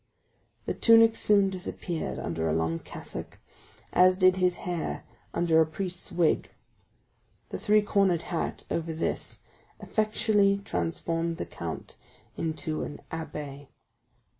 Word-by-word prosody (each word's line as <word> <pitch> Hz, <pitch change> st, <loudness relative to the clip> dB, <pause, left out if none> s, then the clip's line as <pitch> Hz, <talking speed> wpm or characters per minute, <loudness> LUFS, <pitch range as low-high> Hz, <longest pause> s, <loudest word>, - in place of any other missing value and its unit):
The -, -, -1 dB
tunic 225 Hz, -1 st, +6 dB
soon 200 Hz, -3 st, +4 dB
disappeared 180 Hz, -2 st, -4 dB
under 80 Hz, -1 st, -2 dB
a -, -, +1 dB
long 80 Hz, 0 st, 0 dB
cassock, -, -, -8 dB, 0.6 s
as 185 Hz, +1 st, +6 dB
did 185 Hz, -1 st, +5 dB
his 180 Hz, -1 st, +2 dB
hair 175 Hz, -3 st, -3 dB, 0.3 s
under 165 Hz, -2 st, +3 dB
a -, -, +5 dB
priest's 180 Hz, +3 st, -5 dB
wig; 170 Hz, -2 st, +1 dB, 1.0 s
the -, -, -5 dB
three 210 Hz, 0 st, +4 dB
cornered 195 Hz, -5 st, +2 dB
hat 170 Hz, -, -3 dB
over 165 Hz, -1 st, -1 dB
this 160 Hz, -, -3 dB, 0.4 s
effectually 210 Hz, -2 st, +2 dB
transformed 165 Hz, -2 st, -1 dB
the -, -, -3 dB
count -, -, -7 dB, 0.4 s
into 155 Hz, -1 st, -2 dB
an 145 Hz, -, -6 dB
abbé. 145 Hz, -3 st, -6 dB
175 Hz, 120 wpm, -28 LUFS, 160-195 Hz, 1.0 s, tunic